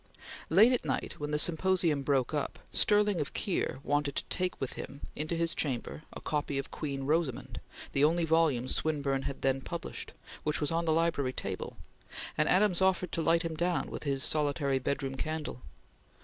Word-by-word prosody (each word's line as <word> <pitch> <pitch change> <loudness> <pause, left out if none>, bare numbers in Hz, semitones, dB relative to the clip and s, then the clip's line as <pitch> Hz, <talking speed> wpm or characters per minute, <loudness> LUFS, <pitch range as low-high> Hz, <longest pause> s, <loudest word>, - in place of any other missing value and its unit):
Late 210 +9 +7
at 250 - +1
night - - -2
when 150 0 -3
the 150 - +1
symposium 170 -2 +2
broke 135 -1 +1
up, 150 - -2
Stirling 205 -4 +4
of 145 - -4
Keir 185 -9 -1
wanted 145 -1 0
to - - 0
take 185 0 -1
with 135 - -3
him 140 +1 -8
to 155 +3 -2
his 170 0 +2
chamber 135 0 -2
a - - -8
copy 145 -2 -2
of 135 - -4
"Queen 140 -2 -3
Rosamund," 150 -2 -1 0.3
the 140 - +2
only 165 +2 +4
volume 160 -6 +3
Swinburne 140 -3 0
had 140 - -8
then 135 0 +2
published, 170 +4 -6 0.3
which 150 0 0
was 150 +1 0
on 165 +1 0
the 160 - +2
library 155 -5 +1
table, 95 -6 -5 0.6
and 155 - +2
Adams 190 -1 +4
offered 185 -2 +2
to 165 - -1
light 165 +1 +3
him 165 -1 -2
down 175 +2 0
with - - -5
his 140 -2 0
solitary 145 -2 +1
bedroom 135 0 -2
candle. 155 -3 -3
155 Hz, 180 wpm, -31 LUFS, 140-170 Hz, 0.6 s, Late